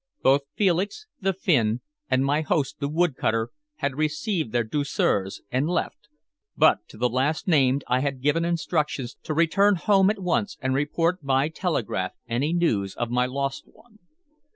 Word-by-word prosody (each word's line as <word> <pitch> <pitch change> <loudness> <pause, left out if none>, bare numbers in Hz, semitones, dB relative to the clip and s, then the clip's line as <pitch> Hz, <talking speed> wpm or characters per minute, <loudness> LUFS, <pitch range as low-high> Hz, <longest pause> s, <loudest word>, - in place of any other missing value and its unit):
Both 135 +2 +5
Felix, 200 - 0
the 195 -1 +1
Finn, 125 - +1 0.3
and 130 +1 +2
my 145 +3 +2
host, 150 -3 -1
the 140 - -2
wood 165 -1 +1
cutter, 115 0 0 0.2
had 140 -3 -3
received 155 - -1
their 120 0 +1
douceurs 110 -6 -1
and 130 +5 0
left, 165 -3 -3 0.5
but - - +5
to - - -14
the 125 +3 +2
last 135 - -1
named 140 -5 +3
I 125 - +2
had 140 -1 -2
given 150 +3 +2
instructions 155 -6 -1
to 155 - -4
return 195 +5 +4
home 195 +2 +3
at 215 - 0
once 190 +2 -1
and 130 0 -1
report 165 +5 0
by 135 +2 +2
telegraph 145 - -2
any 125 +7 0
news 110 - 0
of 120 -1 -3
my 125 +1 +2
lost 135 +1 -3
one. 220 -2 -23
145 Hz, 165 wpm, -25 LUFS, 130-170 Hz, 0.5 s, Both